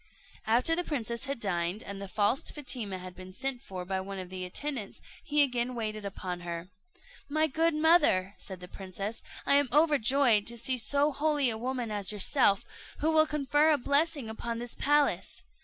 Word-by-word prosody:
After 245 +9 +3
the 355 - 0
princess 235 -6 -3
had 275 -2 -3
dined, 180 -1 -1
and 200 0 -7
the 200 - -5
false 205 +6 +1
Fatima 245 -9 -1
had 180 0 -9
been 185 0 -11
sent 265 0 -2
for 185 -7 -7
by 190 0 -2
one 195 +1 -7
of 185 -1 -7
the 185 -1 -4
attendants, 240 +2 -4 0.2
he 295 -2 +3
again 250 -2 -1
waited 215 -2 -4
upon 185 -2 -5
her. 170 0 -6 0.6
"My 310 +2 +2
good 320 +2 +1
mother," 305 - +4
said 190 -2 -8
the 180 - -8
princess, 195 +4 -6 0.2
"I 280 - +5
am 285 -3 +2
overjoyed 275 -7 +4
to 235 0 -2
see 255 +2 +1
so 285 +6 +3
holy 290 -2 +1
a - - -2
woman 245 -2 -3
as 205 -2 0
yourself, 210 0 +2 0.3
who 315 +2 +1
will 315 0 +5
confer 295 +1 +2
a 305 - +4
blessing 285 0 +1
upon 230 +1 -4
this 240 0 -5
palace. 290 0 +1
235 Hz, 185 wpm, -29 LUFS, 195-285 Hz, 0.6 s, I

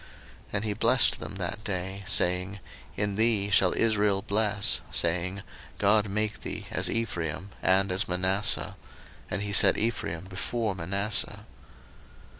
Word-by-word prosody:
01:048:020 - - -25
And 105 0 -1
he 105 - -1
blessed 115 +4 +4
them - - -7
that 100 +2 -5
day, 95 0 -4
saying, 90 +3 +2 0.4
In 100 -1 -1
thee 110 -3 +2
shall 95 -2 +3
Israel 105 -3 +2
bless, 105 0 +2
saying, 90 +3 -1 0.3
God 105 0 +3
make 110 +1 -2
thee - - -6
as - - +1
Ephraim 95 -5 -3
and 95 +1 +2
as 90 +2 0
Manasseh: 95 +2 -1 0.5
and 100 - -3
he 100 0 -4
set 95 -1 +6
Ephraim 105 -7 -2
before 100 +4 -3
Manasseh. 100 +3 -2
100 Hz, 135 wpm, -27 LUFS, 95-105 Hz, 0.5 s, set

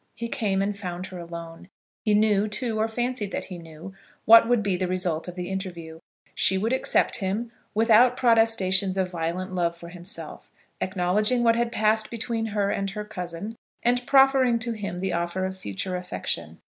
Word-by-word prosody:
He 235 0 -5
came 195 -4 0
and 205 +1 -2
found 180 -2 -5
her 185 -1 -9
alone. 170 0 -9 0.4
He 210 -1 +3
knew, 210 -1 +3
too, 220 +1 -2
or 220 - +2
fancied 240 -2 -2
that - - -2
he 180 -2 -8
knew, 165 +3 -11 0.3
what 230 +1 +8
would 240 -3 +2
be 200 -2 0
the 185 0 -1
result 180 -3 -1
of 180 - -7
the 180 -1 -5
interview. 175 -4 -6 0.3
She 190 - +3
would 220 +6 0
accept 260 - +2
him, 215 +3 -3 0.2
without 230 +3 +5
protestations 225 -6 +3
of 185 -1 0
violent 175 +2 -3
love 170 -2 -1
for 170 0 -10
himself, 175 +4 -8 0.3
acknowledging 205 +6 +1
what 230 -1 +4
had 235 0 0
passed 215 0 +1
between 230 -1 -2
her 205 -2 0
and 195 0 -2
her 210 +1 -6
cousin, 195 +1 -6 0.3
and 245 +1 +2
proffering 270 -3 +5
to 230 +1 -2
him 200 -5 -5
the 190 -2 -1
offer 175 +2 -1
of 190 0 -4
future 180 - -4
affection. 180 0 -3
195 Hz, 185 wpm, -25 LUFS, 180-225 Hz, 0.4 s, what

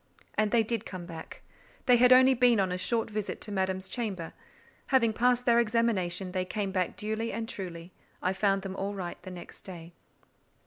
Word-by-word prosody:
And 215 0 +1
they 230 0 +3
did 225 -1 -2
come 185 -2 -7
back: 165 -2 -9 0.4
they 250 -1 +6
had 250 +1 +5
only 260 +1 +8
been 245 -3 +4
on 190 -2 +1
a 180 - -1
short 225 +5 0
visit 210 -1 -3
to 210 - -5
Madame's 190 -1 -1
chamber; 200 -9 -4 0.5
having 230 -5 +3
passed 245 +2 +2
their 235 -1 +5
examination, 210 -6 0
they 185 0 -1
came 195 +1 -3
back 185 -2 -1
duly 220 +2 -2
and 225 0 -4
truly: 175 -4 -7 0.3
I 185 - 0
found 195 0 +1
them 190 -1 -5
all 200 +1 -3
right 180 -3 -6
the - - -9
next 180 -1 -10
day. 170 -2 -10
200 Hz, 190 wpm, -29 LUFS, 185-230 Hz, 0.5 s, only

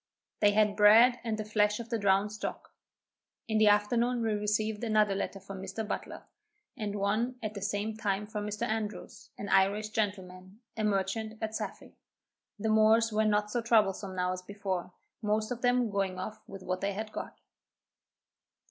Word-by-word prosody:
They 205 - +5
had 210 -1 +3
bread 225 +4 +7
and 225 -2 -2
the 215 - -4
flesh 210 0 +1
of 230 -1 -7
the 230 - 0
drowned 200 +1 +2
stock. 215 - -6 0.7
In 220 -1 +1
the 215 - +5
afternoon 230 +4 +2
we 220 -1 +1
received 210 +1 -1
another 215 -3 +3
letter 195 0 -3
from 195 0 -9
Mr. 195 +3 -5
Butler, - - -5 0.5
and 210 -5 -4
one 215 +5 0
at 215 -1 -3
the 200 - -7
same 205 +2 -2
time 210 -2 -1
from 210 0 -5
Mr. 210 0 -4
Andrews, 215 -2 -4
an 205 - -6
Irish 200 +3 +3
gentleman, 190 -1 -4
a 220 - -2
merchant 210 +2 -1
at 220 -1 -3
Saffy. - - -6 0.6
The 220 +2 -2
Moors 220 +1 +4
were 215 0 +2
not 210 0 +1
so 240 - 0
troublesome 210 -4 +2
now 180 0 0
as 185 - -6
before, 190 -2 -4 0.3
most 215 +1 0
of 245 -1 -4
them 245 -2 +2
going 195 -2 -1
off 215 +3 -6
with 195 -1 -9
what 185 0 -3
they 200 0 -1
had 215 +2 -5
got. - - -7
210 Hz, 175 wpm, -30 LUFS, 200-220 Hz, 0.7 s, bread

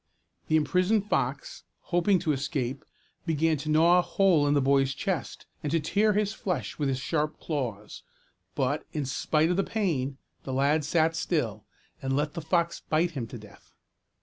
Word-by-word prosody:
The 155 - +2
imprisoned 185 +7 +2
fox, - - -2 0.2
hoping 180 +2 +2
to 155 - +1
escape, 135 -2 -2 0.4
began 160 0 +2
to 150 +2 -5
gnaw 165 +3 +5
a - - +4
hole 175 -6 +3
in 145 - +3
the - - +4
boy's 135 0 +2
chest, 185 -4 -3 0.2
and 150 - -2
to 165 - +2
tear 205 +8 +2
his 210 0 0
flesh 180 -10 -3
with 145 -2 +1
his 130 - 0
sharp 150 +2 -2
claws; 120 -9 -4 0.5
but, 140 +2 0
in 150 -3 -2
spite 155 +5 +1
of 180 - 0
the 195 - +2
pain, 145 -13 -1 0.3
the 130 - -5
lad 145 +4 +2
sat 160 +2 +2
still, 115 - -1 0.4
and 135 0 -1
let 150 +1 0
the 170 - -5
fox 170 +1 0
bite 165 +3 +2
him 130 -7 -4
to - - -8
death. - - -16
155 Hz, 175 wpm, -28 LUFS, 140-175 Hz, 0.5 s, gnaw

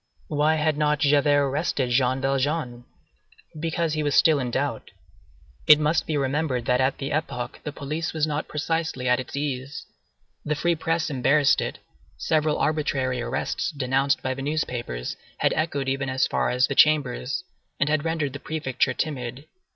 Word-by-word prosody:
Why 150 +1 +2
had 155 -1 +1
not 150 0 +2
Javert 145 -1 +3
arrested 135 -3 -1
Jean 130 +1 +2
Valjean? 135 -2 -1 0.7
Because 165 0 -1
he 155 - -1
was 145 -1 0
still 155 -3 +5
in 125 -2 -2
doubt. - - -2 0.8
It 150 - +9
must 155 +2 +1
be 155 - 0
remembered 135 -2 -1
that 125 +1 +2
at 130 +1 +1
that 135 - -5
epoch 140 -5 -3
the 150 - -4
police 150 +3 -4
was 155 -2 0
not 150 0 -3
precisely 150 -3 -2
at 125 +1 +3
its 130 - -6
ease; 140 -1 -4 0.6
the 150 - -1
free 175 +3 +1
press 165 0 -1
embarrassed 140 +2 +3
it; - - -4 0.4
several 155 -1 +1
arbitrary 135 -5 0
arrests 120 - -2
denounced 135 -2 0
by 130 - 0
the 135 - -7
newspapers, 125 - -3 0.2
had - - +2
echoed 145 -4 -1
even 135 0 -1
as 130 0 +2
far - - 0
as 125 +1 +3
the - - -3
Chambers, 145 +1 +2 0.4
and 145 - +2
had 150 -1 +1
rendered 160 -4 -1
the 140 - -6
Prefecture 150 -5 -1
timid. 130 -3 -4
145 Hz, 165 wpm, -25 LUFS, 130-155 Hz, 0.8 s, It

